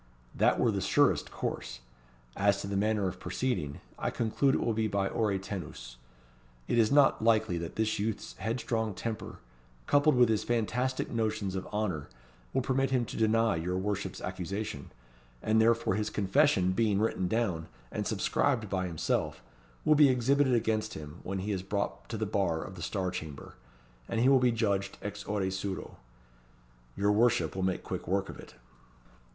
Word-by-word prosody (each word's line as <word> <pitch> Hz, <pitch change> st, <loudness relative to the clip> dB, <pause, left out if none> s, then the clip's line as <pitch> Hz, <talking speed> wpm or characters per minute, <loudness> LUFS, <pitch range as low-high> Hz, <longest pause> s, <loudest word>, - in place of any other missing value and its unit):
That -, -, +3 dB
were -, -, +3 dB
the -, -, -1 dB
surest -, -, +3 dB
course. -, -, -4 dB, 0.5 s
As 100 Hz, 0 st, +2 dB
to -, -, -5 dB
the 100 Hz, -, -3 dB
manner 105 Hz, 0 st, +1 dB
of 90 Hz, -, -5 dB
proceeding, 120 Hz, -, -2 dB, 0.2 s
I -, -, 0 dB
conclude 125 Hz, +4 st, +1 dB
it -, -, 0 dB
will 115 Hz, -, +1 dB
be 110 Hz, 0 st, 0 dB
by 100 Hz, -1 st, 0 dB
Ore 105 Hz, -3 st, 0 dB
tenus. 75 Hz, -11 st, -7 dB, 0.7 s
It 120 Hz, -, +2 dB
is 110 Hz, -2 st, +4 dB
not 140 Hz, -5 st, +5 dB
likely 110 Hz, -6 st, +3 dB
that 85 Hz, 0 st, -6 dB
this 110 Hz, -1 st, 0 dB
youth's 110 Hz, +1 st, -3 dB
headstrong 110 Hz, 0 st, -1 dB
temper, 115 Hz, +1 st, -5 dB, 0.5 s
coupled 145 Hz, +1 st, +4 dB
with 125 Hz, -1 st, +6 dB
his 110 Hz, -1 st, +1 dB
fantastic 120 Hz, +3 st, -1 dB
notions 110 Hz, -4 st, -1 dB
of 95 Hz, -1 st, -4 dB
honour, 95 Hz, -9 st, -2 dB, 0.4 s
will 130 Hz, -, 0 dB
permit 135 Hz, +1 st, +1 dB
him 125 Hz, -2 st, +1 dB
to -, -, -8 dB
deny 110 Hz, -3 st, +2 dB
your 90 Hz, +3 st, -2 dB
worship's 100 Hz, 0 st, -2 dB
accusation, 95 Hz, -3 st, -4 dB, 0.5 s
and 110 Hz, +1 st, +3 dB
therefore 115 Hz, -2 st, +3 dB
his 105 Hz, +1 st, -1 dB
confession 105 Hz, -2 st, +3 dB
being 105 Hz, 0 st, +2 dB
written 105 Hz, -4 st, 0 dB
down, 90 Hz, -7 st, -1 dB, 0.2 s
and -, -, -2 dB
subscribed 115 Hz, -8 st, 0 dB
by 95 Hz, -1 st, 0 dB
himself, 80 Hz, -7 st, -1 dB, 0.4 s
will 155 Hz, -, +6 dB
be 150 Hz, -2 st, +7 dB
exhibited 130 Hz, +1 st, +3 dB
against 110 Hz, -2 st, 0 dB
him 75 Hz, +2 st, -8 dB
when 95 Hz, +1 st, -4 dB
he 100 Hz, +3 st, -2 dB
is 95 Hz, -2 st, -1 dB
brought 100 Hz, +1 st, -3 dB
to 115 Hz, -, -3 dB
the 110 Hz, -, -1 dB
bar 95 Hz, -6 st, 0 dB
of 95 Hz, -, -8 dB
the 90 Hz, -, -10 dB
Star 95 Hz, +1 st, -2 dB
Chamber, 75 Hz, -6 st, -7 dB, 0.6 s
and 115 Hz, -, -1 dB
he 125 Hz, -, +4 dB
will 135 Hz, -1 st, +6 dB
be 125 Hz, -1 st, +3 dB
judged 100 Hz, -4 st, 0 dB
ex -, -, -5 dB
ore 100 Hz, -2 st, -1 dB
suo. 95 Hz, 0 st, -4 dB, 1.0 s
Your 100 Hz, +1 st, +3 dB
worship 120 Hz, +2 st, +2 dB
will 95 Hz, -, -2 dB
make 95 Hz, -1 st, 0 dB
quick -, -, -5 dB
work 95 Hz, +2 st, 0 dB
of -, -, -9 dB
it." -, -, -12 dB
105 Hz, 175 wpm, -30 LUFS, 95-115 Hz, 1.0 s, be